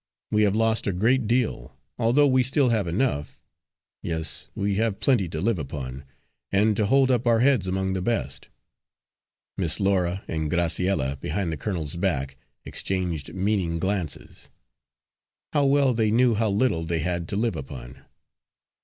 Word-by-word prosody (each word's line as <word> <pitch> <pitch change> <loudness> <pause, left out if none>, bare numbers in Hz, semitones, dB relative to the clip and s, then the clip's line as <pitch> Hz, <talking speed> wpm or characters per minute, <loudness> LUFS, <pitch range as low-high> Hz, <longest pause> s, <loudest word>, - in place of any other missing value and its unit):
We 105 - +3
have 100 0 +1
lost 115 0 +1
a 100 - +1
great 115 +6 +2
deal, 120 +1 -1 0.2
although 120 +5 +4
we 130 -2 +4
still 135 +1 +2
have 110 -6 +1
enough 85 - -1 0.6
yes, 80 -1 -3
we 100 0 -1
have 110 -2 0
plenty 115 -10 +2
to 80 - -4
live 100 +1 0
upon, 70 -2 -6 0.5
and 105 +2 +3
to 105 0 +1
hold 135 +2 +4
up 125 0 +1
our 115 -1 +4
heads 130 -7 +3
among 95 +1 -1
the 95 - -2
best." 70 - -3 1.1
Miss 85 -5 +2
Laura 95 -2 +1
and 80 -1 -2
Graciella, 85 -4 0
behind 85 +4 -2
the - - -2
colonel's 80 -2 -3
back, 70 -8 -1 0.3
exchanged 85 -4 -3
meaning 95 -4 0
glances. 95 -3 -4 1.0
How 145 -1 +3
well 140 -2 +3
they 110 -2 +1
knew 120 +2 +4
how 110 0 +1
little 100 -5 +1
they 80 -1 -2
had 85 +1 -2
to - - -3
live 115 +2 0
upon! 65 -3 -9
95 Hz, 155 wpm, -25 LUFS, 85-115 Hz, 1.1 s, although